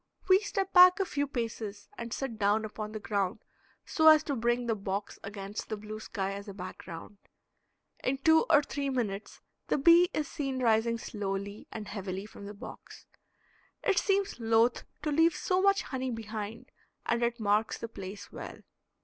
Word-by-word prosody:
We 375 0 +7
step 390 -2 -2
back 365 +1 +9
a 390 - +2
few 285 -4 -1
paces, 225 -5 -4
and 235 -1 -6
sit 240 -3 -4
down 210 +2 +2
upon 215 0 -6
the 215 - -5
ground 205 0 -2 0.4
so 315 -3 +3
as 310 -1 +8
to 285 - -2
bring 240 +1 +1
the 230 - +1
box 200 -1 -4
against 200 0 -6
the 215 - -2
blue 215 +1 -7
sky 195 -3 -3
as 200 +1 -7
a 200 - -8
background. 185 0 -9 0.8
In 265 +1 +1
two 320 +4 +4
or 295 -2 +6
three 285 -1 -3
minutes 215 -6 -3 0.3
the - - +1
bee 340 +5 +6
is 300 -2 -2
seen 275 -4 -3
rising 230 0 +3
slowly 200 -2 -4
and 215 -2 -6
heavily 195 -1 -5
from 205 -1 -10
the 205 - -8
box. - - -11 0.8
It 390 - +3
seems 395 -6 0
loath 230 +1 +2 0.2
to 300 - 0
leave 325 +2 +4
so 365 +4 +1
much 395 +1 +3
honey 260 -1 -3
behind 220 -1 -6 0.3
and 235 0 +1
it 235 0 0
marks 210 +1 +1
the 230 - -5
place 200 -2 -8
well. - - -8
225 Hz, 175 wpm, -30 LUFS, 205-285 Hz, 0.8 s, back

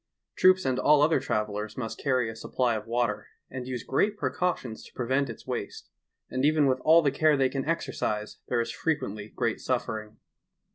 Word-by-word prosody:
Troops 185 0 +5
and 130 -1 +1
all 150 +2 +5
other 155 -1 +4
travelers 105 -3 -3
must 115 -3 -4
earry 130 -3 +2
a - - -11
supply 120 +2 0
of 110 +1 -5
water, 115 -3 -1 0.2
and 125 -1 -6
use 125 -3 -4
great 205 +10 +1
preeautions 130 - -2
to - - -15
prevent 130 +2 0
its 115 - -9
waste; - - -5 0.4
and 130 +1 -2
even 150 0 +4
with 130 -1 +2
all 165 +4 +5
the 140 -2 +1
eare 155 -2 +5
they 130 -1 +2
jcan 135 +1 -3
exereise 110 -10 -2
there 120 - 0
is 115 0 -3
frequently 110 -8 -2
great 115 0 -2
suffering. 110 -4 -3
130 Hz, 185 wpm, -28 LUFS, 115-145 Hz, 0.4 s, Troops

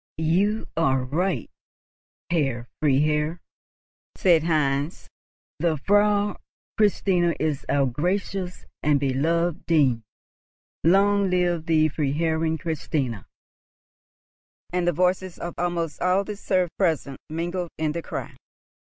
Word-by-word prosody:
"You 190 +7 +1
are 135 -5 +2
right, 170 +8 -1 0.8
Herr 135 -8 0
Freiherr," 150 +3 +2 0.8
said 170 -4 +4
Heinz. 145 -1 0 0.5
"The 160 -1 +1
Frau 205 +4 +2 0.4
Christina 185 -5 +2
is 155 -3 -1
our 140 -1 +3
gracious 180 +6 -2 0.2
and 145 -1 +3
beloved 160 +5 0
dame. 140 -8 +3 0.8
Long 200 +3 +4
live 175 -2 0
the 155 -1 +4
Freiherrinn 160 +2 0
Christina!" 140 - -3 1.5
And 180 -1 0
the - - +5
voices 180 +2 0
of 175 -1 -5
almost 170 -2 -2
all 185 +2 +3
the 210 +1 -6
serfs 185 -4 0
present 160 -7 0
mingled 175 +2 -3
in 155 -1 0
the 170 +2 -3
cry. - - -6
165 Hz, 110 wpm, -24 LUFS, 150-180 Hz, 1.5 s, the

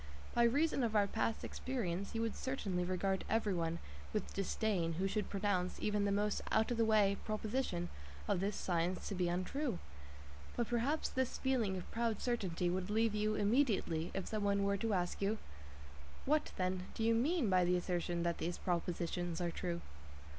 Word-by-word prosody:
By 235 - +5
reason 285 +4 +3
of 225 -3 0
our 205 -1 +5
past 220 +2 -1
experience, 200 -7 -3
you 225 - +1
would 225 - -1
certainly 200 -9 -1
regard 190 +1 0
everyone 180 -7 +1 0.4
with - - -2
disdain 195 -3 0
who 185 +4 0
should 210 +1 -1
pronounce 195 -3 0
even 210 -1 +1
the 200 - +2
most 205 +1 +1
out 220 +2 +3
of 240 - 0
the 230 - +4
way 210 -2 +4
proposition 215 -4 -1 0.4
of - - +2
this 200 +2 0
science 175 0 0
to - - -2
be 180 -2 +1
untrue. 190 - -1 0.8
But 235 - 0
perhaps 245 +6 +1
this 260 -1 -1
feeling 235 -8 +1
of 180 - -7
proud 230 -2 0
certainty 190 -8 0
would 180 +2 -1
leave 220 +1 +2
you 215 0 +1
immediately 205 - +2
if 190 - -1
some 215 -1 -1
one 200 0 +2
were 200 0 +2
to 220 0 0
ask 180 +1 -1
you: 205 +3 +1 0.9
"What, 300 +2 +2
then, 185 0 -1
do 225 - -1
you 230 +1 +4
mean 275 +4 +2
by 185 -2 +4
the 180 +1 +3
assertion 175 -1 -1
that 170 -1 0
these 175 +1 -2
propositions 175 -1 -1
are 175 -1 0
true?" 170 0 -3
200 Hz, 180 wpm, -36 LUFS, 180-225 Hz, 0.9 s, By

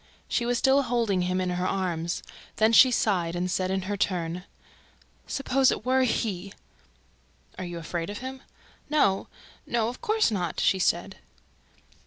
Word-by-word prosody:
She 235 - 0
was 245 0 +1
still 270 +3 +4
holding 230 -7 0
him 180 +1 0
in 185 -1 -1
her 180 +1 -1
arms. 175 -3 -2 0.3
Then 220 +1 +3
she 255 +3 +8
sighed 180 -8 +1
and 180 +1 -1
said, 185 0 0
in 190 0 -1
her 205 +2 -2
turn: 180 -2 -2 0.8
"Suppose 270 -1 +2
it - - -4
were 260 +1 +3
HE!" 200 -5 -2 1.1
"Are 185 - -4
you 175 -1 -6
afraid 170 +1 -4
of 205 - -5
him?" 260 +2 -7 0.5
"No, 240 -11 +2 0.4
no, 230 -1 +1
of 245 - -9
course 430 - +2
not," 180 -6 -2
she 190 - +3
said. 180 +2 0
195 Hz, 160 wpm, -27 LUFS, 180-245 Hz, 1.1 s, she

